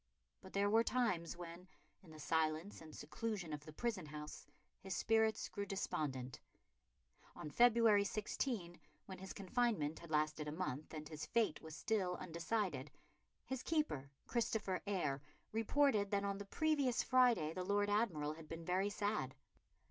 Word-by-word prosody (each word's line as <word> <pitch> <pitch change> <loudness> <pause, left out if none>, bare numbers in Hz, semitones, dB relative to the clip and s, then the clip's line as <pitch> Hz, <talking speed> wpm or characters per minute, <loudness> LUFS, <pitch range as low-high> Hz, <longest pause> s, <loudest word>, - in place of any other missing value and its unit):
But 190 - -12
there 200 +1 +3
were 225 +2 +5
times 185 -11 0
when, 175 +1 -8 0.3
in 180 - -16
the 155 -1 -11
silence 160 +4 0
and 155 -1 -10
seclusion 170 +2 -3
of 150 0 -5
the 155 - -9
prison 195 -1 -2
house, 150 0 -7 0.3
his 190 -2 -4
spirits 220 -1 +3
grew 200 -1 -4
despondent. 135 -9 -2 1.0
On 150 - -6
February 230 -2 +6
16, 200 -3 -2 0.3
when 190 -1 -8
his 190 0 -7
confinement 200 -6 0
had 170 - -11
lasted 155 0 +1
a - - -2
month, 155 -3 -3
and 155 0 -5
his 155 -1 -6
fate 225 -9 +2
was 160 -1 -8
still 195 -5 0
undecided, 170 - -2 0.6
his 265 -1 -3
keeper, 300 - 0 0.2
Christopher 220 -5 0
Eyre, 150 -9 0 0.3
reported 225 -1 +3
that 200 0 +1
on 200 0 -1
the 200 - -5
previous 285 +1 +2
Friday 245 -12 +4
the 185 - -2
Lord 205 +2 +2
Admiral 190 -9 +1
had 160 0 -11
been 165 +1 -6
very 185 +3 +2
sad. 205 -10 -1
190 Hz, 155 wpm, -39 LUFS, 155-220 Hz, 1.0 s, February